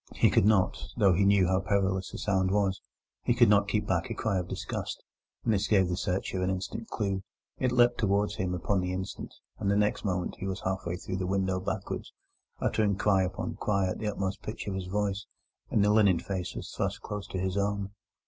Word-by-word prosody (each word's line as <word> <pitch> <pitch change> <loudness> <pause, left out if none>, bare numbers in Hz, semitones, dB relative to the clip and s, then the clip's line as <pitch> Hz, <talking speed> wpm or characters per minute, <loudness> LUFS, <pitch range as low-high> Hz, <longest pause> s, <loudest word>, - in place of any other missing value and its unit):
He - - +4
could 100 - +4
not, 105 -4 +3 0.2
though 95 -2 +5
he 100 +3 +3
knew 100 -1 +5
how 95 +1 +2
perilous 95 -1 0
a - - -6
sound 95 -5 +1
was—he 100 +4 -2
could 120 -3 +6
not 100 -1 +5
keep 105 0 0
back 130 - 0
a 115 - -3
cry 100 -4 0
of 90 - -4
disgust, - - -4 0.4
and 115 - +3
this 100 0 +1
gave 95 -4 +3
the 90 - 0
searcher 95 0 -2
an 90 - +1
instant 95 +4 -3
clue. 100 -3 -2 0.4
It 125 - +1
leapt 120 -1 +4
towards 100 -1 +1
him 90 -1 -1
upon 95 +2 0
the 90 0 -2
instant, 95 +1 -5 0.3
and 100 - 0
the 100 - +3
next 105 0 +1
moment 90 -3 -2
he 95 - -3
was 95 - -3
half 95 -1 -2
way 85 - -1
through 95 +1 -4
the 90 -1 -2
window 95 -1 0
backwards, 95 +2 -4 0.5
uttering 105 -2 +1
cry 100 -1 +3
upon 95 0 -3
cry 100 -3 +1
at - - -5
the 110 - -2
utmost 100 -1 -2
pitch 110 - -6
of 100 - -3
his 95 -1 -4
voice, 100 +1 -1 0.4
and 105 - +3
the 105 - +4
linen 100 -5 +5
face 90 +1 -4
was - - -6
thrust - - -2
close 105 -1 -5
into - - -5
his 95 0 -1
own. 100 0 -1
100 Hz, 220 wpm, -29 LUFS, 95-105 Hz, 0.5 s, could